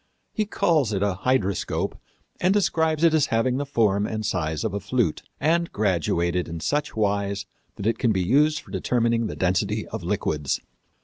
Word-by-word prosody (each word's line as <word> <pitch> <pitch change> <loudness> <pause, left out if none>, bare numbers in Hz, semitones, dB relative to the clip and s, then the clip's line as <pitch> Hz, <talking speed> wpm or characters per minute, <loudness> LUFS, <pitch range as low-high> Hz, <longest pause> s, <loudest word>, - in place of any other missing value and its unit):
He 215 -1 -1
calls 155 - +2
it 100 0 0
a 100 -1 +1
hydroscope 115 -7 0 0.4
and 180 +1 +3
describes 160 -5 +1
it 165 -1 +5
as 155 -3 +3
having 115 +3 +1
the 140 0 -3
form 105 -6 +2
and 110 -1 -3
size 80 -5 -1
of 110 - -2
a 100 - -1
flute, 105 -4 0 0.2
and 170 +3 +1
graduated 90 -3 0
in 85 0 -5
such 150 - -1
wise 100 -2 0 0.3
that 100 - -6
it 115 0 +1
can 120 - +2
be 95 -3 +1
used 150 - +3
for - - -16
determining 115 -2 +1
the - - -5
density 95 +4 0
of 110 - -5
liquids. 80 -6 -1
110 Hz, 180 wpm, -24 LUFS, 95-140 Hz, 0.4 s, it